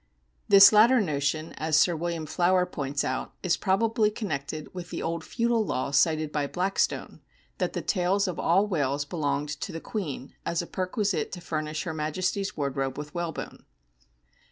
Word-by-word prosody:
" - - -42
The 200 0 +10
latter 230 +4 +6
notion," 155 -3 -1
as 155 0 +2
Sir 170 +2 +4
William 165 0 -3
Flower 180 +4 +2
points 140 -5 -3
out, 130 - -3
"is 180 - +2
probably 215 +3 +2
connected 155 -8 -5
with 180 -1 -7
the - - -4
old 165 0 -2
feudal 235 +1 +1
law 140 -8 -2
cited 155 +1 +2
by 145 -2 -1
Blackstone, 185 +5 -1 0.4
that - - -1
the - - -3
tails 195 +1 +1
of 180 - -4
all 190 +5 +3
whales 145 -7 -1
belonged 145 -2 -2
to 150 +5 -5
the 165 - -5
Queen 155 - -5
as 170 - -1
a 170 - -1
perquisite 190 +2 -1
to 180 - -5
furnish 155 -2 -3
her 160 - -4
Majesty's 180 +6 -2
wardrobe 135 -2 -2
with 150 0 -7
whalebone." 170 -2 -5
165 Hz, 170 wpm, -27 LUFS, 150-190 Hz, 0.4 s, The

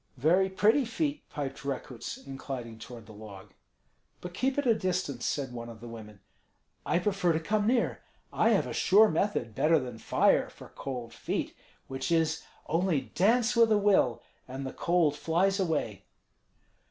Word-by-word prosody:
"Very 175 +8 +3
pretty 210 +9 +3
feet," 290 +5 -3
piped 145 -1 -5
Rekuts, 130 -3 -5
inclining 130 -4 -7
toward 115 -1 -10
the 110 - -13
log. 105 -2 -11 0.7
"But 180 0 -8
keep 265 +8 -1
at 285 - 0
a 235 - +5
distance," 180 - -2
said 135 -4 -2
one 120 -1 -7
of 115 -1 -11
the 120 - -10
women. 105 -4 -10 0.7
"I - - +2
prefer 180 -2 +1
to 160 - 0
come 205 +6 0
near. 240 0 +1 0.3
I - - +3
have - - +3
a - - -5
sure 210 +3 +5
method, 160 - -1
better 160 +8 +3
than 125 -5 -5
fire, - - +2
for - - -14
cold 125 -4 -6
feet; - - -3 0.3
which 135 +5 -4
is, 160 -1 +1 0.2
only 165 -3 0
dance 230 +5 +3
with 230 -1 +5
a 215 - +5
will, 200 - +2 0.2
and 135 +1 -6
the 130 - -5
cold 170 -4 +2
flies 180 +6 +1
away." 155 - -2
160 Hz, 165 wpm, -29 LUFS, 125-195 Hz, 0.7 s, a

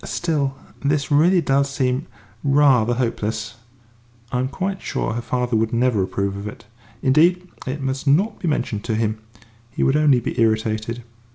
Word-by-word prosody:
Still, 145 -5 -1 0.3
this 145 +1 0
really 170 +5 +5
does 140 -2 +2
seem 130 -2 -1 0.4
rather 135 -5 +4
hopeless. 115 -2 -2 0.7
I 125 - 0
am 130 - 0
quite 190 +7 -3
sure - - -2
her 120 - -3
father 125 0 -1
would 110 0 +1
never 120 -3 +2
approve 100 +1 -2
of 100 +1 -6
it. 105 - -9 0.4
Indeed, 175 +7 +3 0.2
it 135 +3 -3
must 135 +1 -3
not 175 +11 +2
be 175 - -3
mentioned 120 -8 -1
to 110 - -1
him 110 -1 -1 0.5
he - - -2
would 135 - +3
only 150 -4 +4
be 115 - -2
irritated." 110 +1 0
130 Hz, 165 wpm, -21 LUFS, 110-145 Hz, 0.7 s, really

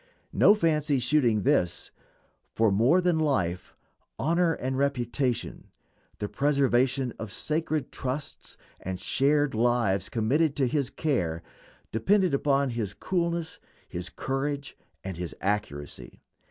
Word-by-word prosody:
No 205 - +6
fancy 155 -6 +1
shooting 120 -5 +2
this; 90 -1 +1 0.6
for 110 -2 +3
more 120 - +4
than 175 -3 +2
life 90 - -1 0.4
honor 170 +2 +2
and 130 -3 -3
reputation, 130 -2 -1 0.5
the 105 - -3
preservation 135 -2 +1
of 110 -3 -6
sacred 155 +3 -2
trusts 135 +2 -5 0.2
and 95 0 -4
cherished 145 +6 +2
lives 115 -5 +1
committed 140 +7 +1
to 140 - +2
his 140 +1 0
care, 85 - -1 0.5
depend 185 - +2
upon 140 -1 +2
his 105 -4 -3
coolness, 170 -3 -2 0.3
his 90 +1 -4
courage, 140 +4 -3 0.3
and 95 -3 -5
his 90 -1 -5
accuracy. 95 -8 -4
135 Hz, 115 wpm, -27 LUFS, 110-150 Hz, 0.6 s, No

